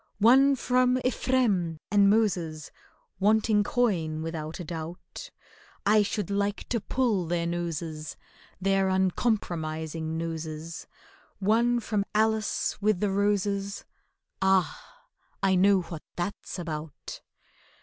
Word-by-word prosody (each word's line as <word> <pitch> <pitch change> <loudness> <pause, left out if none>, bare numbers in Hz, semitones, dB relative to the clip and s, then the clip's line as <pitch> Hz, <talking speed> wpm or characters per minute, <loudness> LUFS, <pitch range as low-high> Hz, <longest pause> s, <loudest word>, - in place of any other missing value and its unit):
One 265 +6 +6
from 250 0 +2
EPHRAIM 210 -11 +1
and 200 -1 +5
MOSES, 175 -8 0 0.5
Wanting 210 +1 +3
coin 170 -10 0
without 160 0 -5
a - - -4
doubt, 170 - -7 0.6
I 210 +1 +5
should 205 0 -2
like 200 +1 -1
to 235 -3 0
pull 220 -10 0
their 170 0 0
noses— 165 -2 -4 0.4
Their 195 0 +2
uncompromising 165 -5 -1
noses; 160 -1 -5 0.5
One 230 +4 +2
from 210 -3 -1
ALICE 220 -1 +1
with 210 -2 +2
the 205 0 0
roses— 200 0 0 0.6
Ah, 190 - 0 0.4
I 195 -1 +4
know 190 0 +4
what 165 -2 -8
that's 185 +2 -4
about! 155 -3 -6
195 Hz, 110 wpm, -27 LUFS, 165-215 Hz, 0.6 s, One